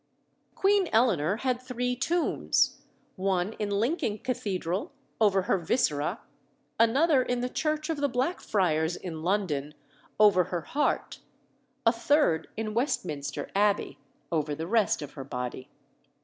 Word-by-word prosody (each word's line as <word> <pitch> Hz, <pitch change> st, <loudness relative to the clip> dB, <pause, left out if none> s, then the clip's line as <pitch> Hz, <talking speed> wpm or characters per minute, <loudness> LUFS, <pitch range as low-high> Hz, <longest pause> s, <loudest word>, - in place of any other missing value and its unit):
Queen 395 Hz, -2 st, +3 dB
Eleanor 205 Hz, -, +3 dB
had 250 Hz, 0 st, -1 dB
three 250 Hz, -1 st, -2 dB
tombs 330 Hz, +7 st, +1 dB, 0.4 s
one 190 Hz, +1 st, 0 dB
in 210 Hz, -1 st, -1 dB
Lincoln 215 Hz, -, 0 dB
Cathedral, 205 Hz, -, -3 dB, 0.3 s
over 200 Hz, -3 st, +3 dB
her 190 Hz, -, +1 dB
viscera; 170 Hz, -, 0 dB, 0.6 s
another 265 Hz, +5 st, +4 dB
in 245 Hz, -1 st, -1 dB
the 250 Hz, -, 0 dB
church 310 Hz, +2 st, -1 dB
of 325 Hz, -2 st, -2 dB
the 285 Hz, 0 st, +1 dB
Blackfriars 190 Hz, -, 0 dB
in 165 Hz, -4 st, -6 dB
London, 160 Hz, -6 st, -1 dB, 0.4 s
over 200 Hz, -4 st, +6 dB
her 175 Hz, 0 st, -3 dB
heart; 290 Hz, -, -1 dB, 0.7 s
a 230 Hz, -, +7 dB
third 235 Hz, -, +2 dB
in 215 Hz, -1 st, -3 dB
Westminster 185 Hz, -, -2 dB
Abbey, 205 Hz, 0 st, +1 dB, 0.3 s
over 150 Hz, -3 st, 0 dB
the 160 Hz, +2 st, -4 dB
rest 210 Hz, -4 st, +2 dB
of 145 Hz, -, -8 dB
her 135 Hz, -, -7 dB
body. 125 Hz, 0 st, -5 dB
210 Hz, 130 wpm, -28 LUFS, 170-250 Hz, 0.7 s, a